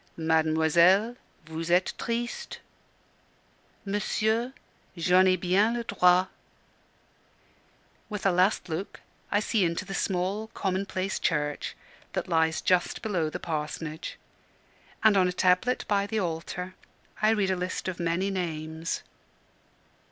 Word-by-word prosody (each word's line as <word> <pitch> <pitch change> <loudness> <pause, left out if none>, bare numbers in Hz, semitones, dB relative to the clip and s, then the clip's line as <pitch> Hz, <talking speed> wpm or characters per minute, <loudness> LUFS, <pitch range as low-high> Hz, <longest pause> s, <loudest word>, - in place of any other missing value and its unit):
"Mademoiselle, 160 +6 +3 0.3
vous 160 +1 -5
etes 180 +2 +3
triste." 235 0 -3 1.3
"Monsieur, 220 +4 0 0.5
j'en 180 +2 +4
ai 185 - +5
bien 190 +6 +2
le 240 - -2
droit." 180 -4 +4 1.8
With 210 -2 -5
a 195 - +5
last 185 +4 +2
look 170 +4 -5 0.3
I 205 - +3
see 215 -1 +1
into 170 +3 -1
the 195 - -6
small, 195 +4 -1
commonplace 190 0 -2
church 150 -3 -1 0.4
that - - -2
lies 160 -1 +2
just 180 -1 +1
below 180 -8 0
the - - -5
parsonage: 155 0 -4 0.9
and 220 -2 +6
on 185 -2 +4
a - - 0
tablet 180 +7 +2
by 200 -1 +1
the 220 - -2
altar 180 +1 -4 0.5
I 215 - +4
read 205 -4 +2
a - - +1
list 180 +1 -3
of 185 -1 -4
many 170 +3 0
names. 160 -3 -3
185 Hz, 120 wpm, -28 LUFS, 165-200 Hz, 1.8 s, and